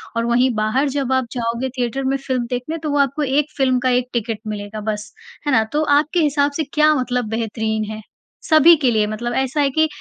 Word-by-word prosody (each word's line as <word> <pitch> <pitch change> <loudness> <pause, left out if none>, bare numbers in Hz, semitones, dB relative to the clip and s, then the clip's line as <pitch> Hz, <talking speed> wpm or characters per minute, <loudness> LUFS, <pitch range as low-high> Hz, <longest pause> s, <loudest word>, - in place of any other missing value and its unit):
और 230 0 0
वहीं 245 +2 +2
बाहर 215 +7 +1
जब 270 -1 -2
आप 260 -1 +1
जाओगे 235 +1 -2
थिएटर 250 +2 -2
में 270 +1 0
फिल्म 255 -2 0
देखने 250 +6 -3
तो 305 - -2
वो 290 - +1
आपको 280 +2 +1
1 290 +2 0
फिल्म 260 -2 +2
का 255 +1 0
1 250 0 +1
टिकट 225 -2 -2
मिलेगा 210 0 -5
बस, 210 0 -7 0.3
है - - +2
ना? 225 -4 +4
तो 305 - +1
आपके 310 +4 +1
हिसाब 290 -2 +2
से 320 - 0
क्या 305 0 +4
मतलब 250 -4 -1
बेहतरीन 220 -1 -2
है? 215 0 -7 0.5
सभी 315 +2 +7
के 255 -3 +3
लिए, 215 -2 +2
मतलब 235 +3 -4
ऐसा 265 +3 0
है 280 - +2
कि 315 +3 +2
255 Hz, 220 wpm, -20 LUFS, 230-285 Hz, 0.5 s, सभी